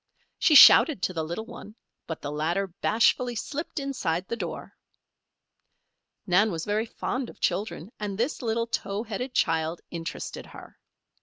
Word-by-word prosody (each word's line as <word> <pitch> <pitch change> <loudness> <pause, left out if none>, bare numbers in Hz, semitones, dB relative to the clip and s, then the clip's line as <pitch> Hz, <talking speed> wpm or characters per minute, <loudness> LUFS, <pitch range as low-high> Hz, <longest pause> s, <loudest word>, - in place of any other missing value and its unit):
She 310 - +4
shouted 280 - +8
to 185 - 0
the 160 -2 -2
little 170 +8 -5
one, 225 -2 -11 0.3
but 160 - -6
the 145 - -4
latter 165 +6 -1
bashfully 230 +6 +1
slipped 300 +7 -4
inside 190 -11 -2
the - - -3
door. - - -6 1.5
Nan 200 +3 +3
was 165 -2 -4
very 215 +2 -1
fond 250 +2 -4
of - - -14
children 190 0 -2
and 205 -2 -4
this 245 +7 -1
little 230 -1 -1
towheaded 225 +3 -4
child 160 +1 0
interested 165 -1 -6
her. - - -14
210 Hz, 145 wpm, -26 LUFS, 170-235 Hz, 1.5 s, shouted